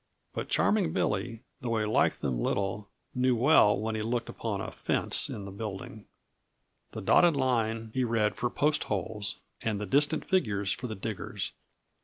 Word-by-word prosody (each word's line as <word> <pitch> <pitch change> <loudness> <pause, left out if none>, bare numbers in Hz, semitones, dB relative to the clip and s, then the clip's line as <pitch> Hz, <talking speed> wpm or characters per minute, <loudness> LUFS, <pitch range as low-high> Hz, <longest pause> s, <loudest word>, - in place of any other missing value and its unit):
But - - -4
Charming 210 -5 +2
Billy, 115 +3 -1 0.2
though 115 -3 -1
he 110 - 0
liked 105 - +2
them 65 -4 -1
little, 100 +8 -1 0.2
knew 125 0 +2
well 120 -4 +5
when 110 +1 -2
he 110 - -2
looked 115 +2 -2
upon - - -3
a - - -5
fence - - +1
in 100 - -6
the 100 - -7
building. 100 +1 -7 0.9
The - - -5
dotted 175 -3 +5
line 115 -4 0
he 130 - +1
read 115 -3 +1
for 120 - -1
post 150 +4 +1
holes 100 +1 -2 0.2
and 110 -3 -1
the 105 - -3
distant 145 - +2
figures 105 - +1
for 125 - -3
the 110 - -5
diggers. 105 +1 -4
110 Hz, 170 wpm, -29 LUFS, 105-125 Hz, 0.9 s, well